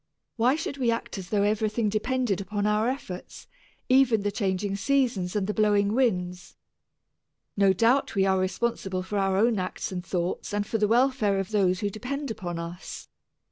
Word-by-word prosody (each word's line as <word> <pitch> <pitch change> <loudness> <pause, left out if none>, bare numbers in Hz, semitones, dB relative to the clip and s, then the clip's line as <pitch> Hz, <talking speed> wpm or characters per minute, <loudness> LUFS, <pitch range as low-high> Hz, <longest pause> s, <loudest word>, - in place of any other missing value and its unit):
Why 245 +4 +3
should 305 -3 -4
we 245 -3 +2
act 230 -3 -2
as 185 -1 -9
though 205 -1 +2
everything 215 +1 +1
depended 215 -1 0
upon 205 +1 -2
our 210 +2 +2
efforts, 190 -9 -7 0.4
even 255 -5 +4
the 205 - 0
changing 195 -1 -1
seasons 230 -5 0
and 205 -2 +1
the 210 - -2
blowing 205 -1 +2
winds? 180 -8 -1 1.0
No 200 -1 +4
doubt 230 +7 +2
we 195 -1 +3
are 190 -1 +2
responsible 185 -1 -1
for 200 +2 -2
our 195 -1 +1
own 225 0 +3
acts 185 +1 -4
and 180 -1 -4
thoughts 180 +3 -3
and 205 0 0
for 225 +1 -2
the 210 - +3
welfare 235 -3 +2
of 195 +2 -3
those 190 -2 +2
who 205 -1 -1
depend 265 +5 -4
upon 175 -5 -5
us. 170 +2 -7
205 Hz, 180 wpm, -26 LUFS, 190-230 Hz, 1.0 s, even